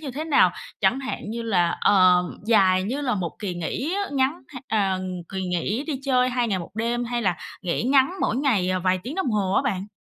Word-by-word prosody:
như 290 -4 -5
thế 300 +5 -5
nào? 320 - +4 0.3
Chẳng 265 - +2
hạn 265 -5 -5
như 230 +1 -4
là, 180 -7 +1
ờm, 180 -2 +4
dài 185 -5 +4
như 250 +9 -3
là 255 -5 0
một 180 -4 -3
kỳ 195 -4 -4
nghỉ 255 - -3
á, 405 - 0
ngắn 275 +4 0
h 260 - -10
ờ, 195 -4 +1 0.3
kỳ 190 -1 -4
nghỉ 185 - -2
đi 285 -5 -3
chơi 255 -2 +3
2 245 -2 0
ngày 195 - 0
1 170 - -8
đêm 235 +2 -1
hay 240 0 -2
là 180 -5 +1 0.3
nghỉ 180 +3 -1
ngắn 265 +5 +3
mỗi 220 - 0
ngày, 240 -10 +1
ờ, 185 - 0
vài 185 +1 +1
tiếng 255 +9 -6
đồng 380 -9 -1
hồ 200 -3 0
á - - +3
bạn. 200 -8 -2
225 Hz, 235 wpm, -24 LUFS, 185-265 Hz, 0.3 s, nào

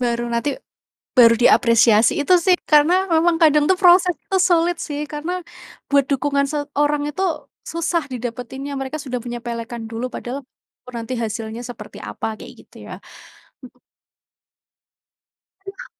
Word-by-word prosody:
Baru 240 -1 -1
nanti, 245 +4 -1 0.6
baru 230 -2 +7
diapresiasi, 230 -2 +4
itu 325 - +1
sih 360 +1 +3
karena 330 +6 +5
memang 330 +1 +3
kadang 300 -1 +5
tuh 375 - +4
proses 360 -1 +5 0.2
tuh 380 -1 +2
sulit 345 -1 +2
sih, 295 -1 -4
karena 320 +5 -5 0.5
buat 280 -1 +4
dukungan 280 0 0
seorang 290 0 -1
itu 375 +6 -4 0.5
susah 335 -2 -2
didapatinnya, 250 +3 -6
mereka 270 +3 -4
sudah 250 -3 -4
menyepelekan 235 -1 -6
dulu 235 +3 -4
padahal 255 +3 -6 0.5
ru - - -7
nanti 235 +1 -4
hasilnya 225 +1 -4
seperti 235 -4 -10
apa 105 - -5
kayak - - -11
gitu - - -23
ya, - - -7 0.7
mhm. 255 -1 -15 1.8
Aduh. 395 +6 -10
280 Hz, 135 wpm, -20 LUFS, 240-325 Hz, 1.8 s, baru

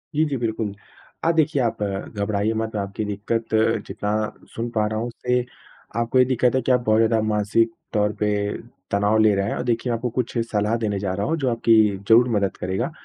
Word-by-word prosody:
जी, 155 - +3
जी, 140 -3 -2
बिल्कुल। 110 -3 -2 0.5
अ, 165 - +4
देखिए 155 -4 +2
आप 115 -3 -1
घबराइए 100 +1 -2
मत, 110 0 -3
आपकी 100 +1 -3
दिक्कत 105 +3 -3 0.4
जितना 105 0 -3 0.4
सुन 115 +1 -3
पा 110 -1 +2
रहा 110 0 -2
हूँ 120 - -2
उससे 125 +1 -1 0.5
आपको 120 +2 +2
ये 125 - +6
दिक्कत 125 0 +2
है 130 - +2
कि 130 - 0
आप 125 - +4
बहुत 110 0 +4
ज़्यादा 115 -1 +3
मानसिक 105 +2 +2 0.2
तौर 105 -1 +1
पे 105 - +1 0.6
तनाव 105 +2 +2
ले 110 -1 +5
रहे 100 +1 0
हैं - - -2
और - - -3
देखिए 120 0 -1
मैं 115 - 0
आपको 125 +1 -2
कुछ 120 0 -3
सलाह 105 +1 +1
देने 105 -4 -1
जा 95 -2 -2
रहा 100 +2 -2
हूँ, 165 - 0
जो 135 -4 0
आपकी 115 -1 +3 0.3
ज़रूर 120 +2 +6
मदद 100 -1 -1
करेगा। 95 - -2
110 Hz, 210 wpm, -23 LUFS, 105-120 Hz, 0.6 s, ये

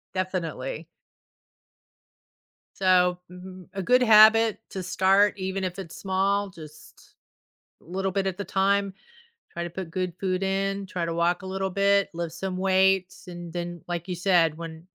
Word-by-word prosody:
Definitely. 185 - -3 1.9
So, 180 -1 +3
mhm, 185 0 -11
a 195 - -3
good 250 +6 +4
habit 220 -1 +6
to 190 -3 -5
start, 195 +3 +3
even 190 +1 -3
if 185 +1 -4
it's 165 -5 -8
small, 200 +1 0
just 155 -4 -12 1.1
a - - -24
little 190 +3 -2
bit 195 0 -1
at 190 +1 -3
a - - -2
time. 200 0 +1 0.6
Try 170 - -4
to 175 - -5
put 175 -1 -7
good 180 -1 -2
food 185 0 -1
in, 195 +1 -1
try 180 -2 -3
to 165 - -3
walk 170 +2 +1
a - - -10
little 190 0 -2
bit, 200 +1 +2
lift 170 -1 -4
some 185 +2 -4
weights, 190 0 +1
and 175 -1 -8
then, 175 -1 -5
like 175 +1 -4
you 180 - -3
said, 170 -4 +2
when 165 0 -9
185 Hz, 160 wpm, -25 LUFS, 175-195 Hz, 1.9 s, habit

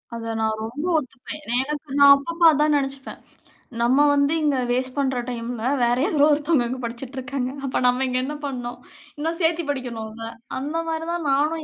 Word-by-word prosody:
அத 230 -1 -4
நான் 220 0 0
ரொம்ப 265 +9 -5
ஒத்துப்பேன். 260 +2 -7
என 240 -2 0
எனக்கு 290 -1 -5
நான் 280 0 +10
அப்பப்போ 335 +4 -1
அதான் 300 0 +2
நினச்சுப்பேன். 270 -1 -4 0.6
நம்ம 245 +3 +3 0.2
வந்து 280 +1 +2
இங்க 290 -3 +2
வாஸ்ட் 255 +1 -1
பண்ற 265 -2 0
டைமில 235 -1 -5 0.2
வேறு 240 +1 +2
யாரோ 295 -3 +3
ஒருத்தவங்க 290 -4 +2
இங்கே 255 +1 -4
படிச்சிட்டு 240 +3 -6
இருக்காங்க. 255 0 -3 0.2
அப்போ 265 - -1
நம்ம 250 +2 +2
இங்கே 255 0 0
என்ன 300 +2 -4
பண்ணோம். 245 -3 -5 0.4
இன்னும் 325 +3 -2
சேர்த்தி 330 0 +2
படிக்கணும்ல. 225 -4 -6 0.3
அந்த 290 +4 -4
மாதிரி 325 0 -3
தான் 335 -4 -3
நானும் 305 +3 +1
270 Hz, 175 wpm, -23 LUFS, 245-295 Hz, 0.6 s, நான்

